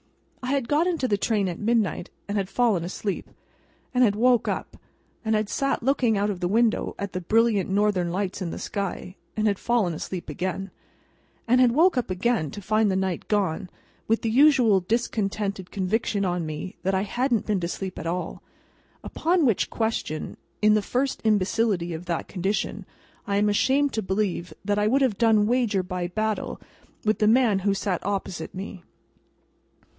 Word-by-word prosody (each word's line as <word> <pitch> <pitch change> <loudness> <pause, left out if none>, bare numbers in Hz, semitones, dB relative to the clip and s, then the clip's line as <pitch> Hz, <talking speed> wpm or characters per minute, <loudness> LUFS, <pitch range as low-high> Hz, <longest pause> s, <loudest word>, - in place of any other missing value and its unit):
I 255 +1 -1
had 270 -4 -1
got 305 +6 +2
into 330 -8 0
the 210 - +2
train 205 -1 0
at 175 - -4
midnight, 215 -6 0 0.2
and 205 - -3
had 195 -2 -1
fallen 225 -8 +2
asleep, 190 +2 -4 0.6
and 250 0 +4
had 205 -4 +3
woke 245 +2 +3
up - - -3 0.5
and 220 -1 +1
had 215 -1 0
sat 275 +2 -1
looking 245 -4 +2
out 205 +1 +1
of 180 -2 -6
window 220 +5 +1
at 200 -1 -5
the 185 - -3
brilliant 215 +1 +2
Northern 195 -3 +1
Lights 195 +1 -2
in 180 - -2
the - - -6
sky, 195 -2 -4 0.2
and 215 - +1
had 200 -2 +1
fallen 230 -8 +1
asleep 175 +3 -5
again, 185 +5 -3 0.8
and 250 +2 +5
had 250 -2 +5
woke 325 +4 +4
up 245 - 0
again 185 -3 0
to 205 - -7
find 215 +1 +2
the 190 - +1
night 190 -3 -2
gone, 190 -4 0 0.4
with 225 +1 +1
the 225 - 0
usual 250 -6 +5
discontented 200 -2 -2
conviction 200 +1 -1
on 175 -3 -1
me 155 +4 -6
that 190 +2 0
I 190 - +1
hadn't 240 +1 0
been 210 -3 0
to 170 - -2
sleep 190 +1 -5
at 165 - -5
all;—upon 310 - -3
which 230 -7 +2
question, 220 -9 -2 0.3
in 215 0 +6
the 215 - +3
first 255 +6 -1
imbecility 205 -4 +1
of 165 +2 -7
that 170 -2 -2
condition, 195 +3 -2 0.4
I 200 0 +1
am 205 +1 +3
ashamed 270 +7 +2
to 220 - 0
believe 190 -3 -1
that 205 0 +1
I 210 - +2
would 270 +5 +3
have 230 -7 0
done 220 -3 +4
wager 230 -5 +1
by 180 -1 -3
battle 215 +3 -2 0.5
with 215 0 +2
the 210 - +3
man 225 -3 +4
who 195 +1 +1
sat 195 -2 -2
opposite 190 -4 -3
me. 190 -1 -7
205 Hz, 180 wpm, -25 LUFS, 185-230 Hz, 0.8 s, in